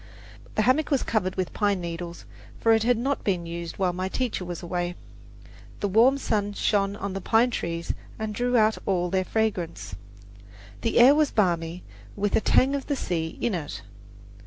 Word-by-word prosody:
The 215 - +2
hammock 275 +6 +2
was 275 -4 +2
covered 185 -5 -1
with 185 -2 -2
pine 205 -3 +1
needles, 170 0 -6 0.3
for 225 - +3
it 225 - +3
had 240 +1 +3
not 270 +4 -1
been 180 -4 0
used 170 0 -6
while 185 -2 +1
my 185 +1 -3
teacher 245 -4 -2
was 175 0 -6
away. 175 0 -2 0.8
The 205 - 0
warm 235 +8 +5
sun 205 -6 -1
shone 200 -1 +1
on 200 -1 -4
the 195 - -4
pine 230 +6 +3
trees 170 -5 -3 0.2
and 220 -1 -3
drew 245 +3 +1
out 220 0 +3
all 180 -3 +1
their 190 -1 +2
fragrance. 200 - -2 0.9
The 230 - 0
air 250 +4 +8
was 300 0 +3
balmy, 175 -4 0 0.3
with 205 0 0
a - - +3
tang 265 +5 +3
of 280 -1 -3
the 285 - 0
sea 165 -9 -3
in 235 - 0
it. 145 - -5
200 Hz, 180 wpm, -26 LUFS, 175-230 Hz, 0.9 s, air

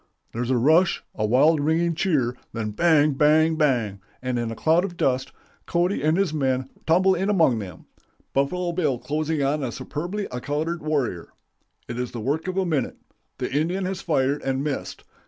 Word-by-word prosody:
'... - - -45
"There's 120 +1 -3
a 130 - +3
rush, 160 +9 +3
a 110 - -1
wild 150 +7 +4
ringing 165 +3 +1
cheer; 150 -8 0 0.2
then 110 -2 -3
bang, 155 +3 +3
bang, 155 +3 +4
bang! 120 - 0 0.2
and 125 -1 -2
in 120 -1 -2
a 115 - -5
cloud 165 +7 +3
of 180 -3 -5
dust, 130 -3 0 0.4
Cody 175 +3 +1
and 155 +3 +2
his 190 -5 +1
men 130 -3 -1 0.2
tumble 185 +4 +4
in 190 +2 -1
among 160 - +3
them, 90 -6 -9 0.5
Buffalo 175 +6 0
Bill 155 -7 0
closing 155 +3 -2
on 145 +2 0
a 130 -3 -2
superbly 175 - -4
accoutered 150 +7 -3
warrior. 140 - -2 0.5
It 120 0 -5
is 125 - -3
the 120 - -5
work 145 - -2
of 185 0 -3
a 190 - +2
minute; 150 -7 -1 0.4
the - - -3
Indian 175 +6 0
has 190 0 -3
fired 140 -3 +1
and 135 0 -1
missed. 145 -2 -4
150 Hz, 185 wpm, -24 LUFS, 130-170 Hz, 0.5 s, wild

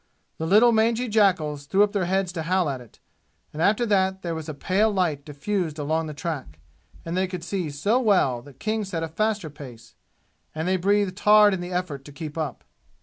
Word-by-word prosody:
The 160 - -2
little 215 +6 +6
mangy 230 +2 +2
jackals 170 -10 +1
threw 195 +5 +4
up 210 - +1
their 200 -3 0
heads 190 0 0
to 170 -2 -4
howl 180 +1 +1
at 130 -2 -6
it; 120 - -17 0.5
and 155 - -5
after 210 +6 +3
that 190 -3 +1
there 170 -2 -2
was 160 -1 -6
pale 200 +7 +2
light 170 -8 0
diffused 155 +3 -3
along 155 +2 -1
the 150 - -7
track, 145 - -5 0.5
and 165 +1 -3
they 185 +1 +1
could 180 -2 -6
see 180 -3 -3
so 175 - +1
well 185 - +2
that 135 +1 -16
King 215 0 -1
set 175 -5 -4
a - - -2
faster 205 0 -1
pace, 125 -6 -12 0.6
and 160 +2 -2
they 185 0 +2
breathed 200 +1 +1
hard 210 -1 +6
in 185 - -2
the 175 +1 -6
effort 175 -7 -3
to 145 - -11
keep 150 0 -7
up. 155 -6 -4
180 Hz, 205 wpm, -24 LUFS, 155-205 Hz, 0.6 s, little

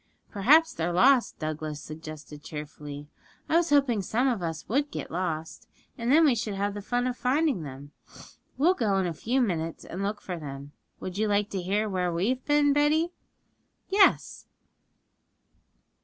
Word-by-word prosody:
'Perhaps 305 +11 +4
they're 170 +1 -2
lost,' 250 +8 +4
Douglas 155 -1 -4
suggested 155 -1 -9
cheerfully; 150 -1 -8 0.4
'I 325 - +3
was 345 0 +2
hoping 275 -7 +3
some 240 +7 0
of 235 -7 0
us 165 -2 -4
would 285 +6 0
get - - -6
lost, 165 +3 -4 0.3
and 235 +1 -1
then 320 +3 +6
we 280 - +5
should 220 -3 -3
have 200 +1 -1
the 205 - -6
fun 245 +4 -1
of 250 -1 -1
finding 265 - +1
them. 140 0 -9 0.7
We'll 325 +7 +4
go 215 - 0
in 190 - +1
a 170 - -2
few 245 - 0
minutes 165 -7 -2
and 185 - -6
look 205 +1 -2
for 180 -4 -6
them. 140 -1 -8 0.3
Would 185 +2 -6
you 215 - +2
like 205 0 +1
to 195 - -2
hear 205 +4 0
where 180 -3 -1
we 175 +6 0
have 255 0 -1
been, 290 -1 +3
Betty?' 310 +4 +2 0.8
'Yes.' 390 0 +3
205 Hz, 170 wpm, -27 LUFS, 165-265 Hz, 0.8 s, then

